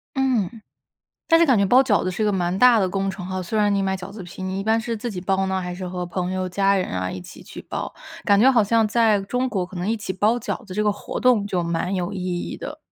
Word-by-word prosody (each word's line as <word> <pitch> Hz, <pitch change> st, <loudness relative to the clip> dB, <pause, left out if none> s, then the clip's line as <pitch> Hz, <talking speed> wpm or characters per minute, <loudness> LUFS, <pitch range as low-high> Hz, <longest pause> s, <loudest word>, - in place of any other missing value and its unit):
嗯， 240 Hz, -5 st, 0 dB, 0.7 s
但 330 Hz, -, +5 dB
是 335 Hz, -, +5 dB
感 260 Hz, -5 st, +4 dB
觉 200 Hz, -, +3 dB
包 250 Hz, +7 st, +6 dB
饺 225 Hz, -6 st, +2 dB
子 185 Hz, -, 0 dB
是 185 Hz, +4 st, -3 dB
一 -, -, +2 dB
个 210 Hz, -, +2 dB
蛮 180 Hz, -1 st, 0 dB
大 250 Hz, 0 st, +6 dB
的 190 Hz, -3 st, +2 dB
工 195 Hz, +1 st, -1 dB
程 190 Hz, -1 st, -7 dB
哈， 185 Hz, 0 st, -3 dB
虽 215 Hz, +5 st, -2 dB
然 205 Hz, -1 st, +3 dB
你 200 Hz, -, +1 dB
买 190 Hz, 0 st, 0 dB
饺 180 Hz, 0 st, -8 dB
子 205 Hz, 0 st, -9 dB
皮， 180 Hz, +1 st, -9 dB
你 190 Hz, +1 st, -3 dB
一 -, -, -3 dB
般 220 Hz, +1 st, +3 dB
是 230 Hz, +1 st, -3 dB
自 235 Hz, +3 st, -4 dB
己 185 Hz, -4 st, -5 dB
包 190 Hz, +1 st, 0 dB
呢， 190 Hz, 0 st, -1 dB
还 180 Hz, -1 st, -5 dB
是 180 Hz, 0 st, -6 dB
和 180 Hz, 0 st, -4 dB
朋 180 Hz, +1 st, -3 dB
友、 185 Hz, 0 st, -2 dB
家 195 Hz, +2 st, +2 dB
人 185 Hz, -, 0 dB
啊 95 Hz, 0 st, -2 dB
一 95 Hz, -, -6 dB
起 -, -, -12 dB
去 -, -, -10 dB
包？ -, -, -5 dB, 0.3 s
感 200 Hz, -1 st, +4 dB
觉 250 Hz, +6 st, +6 dB
好 240 Hz, -4 st, +4 dB
像 225 Hz, +2 st, +2 dB
在 220 Hz, -2 st, +3 dB
中 250 Hz, +6 st, -1 dB
国 195 Hz, -6 st, -1 dB
可 185 Hz, +1 st, -10 dB
能 175 Hz, +3 st, -2 dB
一 225 Hz, -, +1 dB
起 205 Hz, -3 st, -4 dB
包 210 Hz, +5 st, +2 dB
饺 245 Hz, +2 st, -5 dB
子 185 Hz, -, -8 dB
这 210 Hz, -, +1 dB
个 210 Hz, -1 st, +2 dB
活 -, -, -6 dB
动 245 Hz, -5 st, +3 dB
就 185 Hz, -3 st, -1 dB
蛮 170 Hz, +3 st, -2 dB
有 180 Hz, +1 st, -2 dB
意 190 Hz, -2 st, -4 dB, 0.2 s
义 -, -, -5 dB
的。 -, -, -7 dB
195 Hz, 315 characters per minute, -23 LUFS, 185-220 Hz, 0.7 s, 包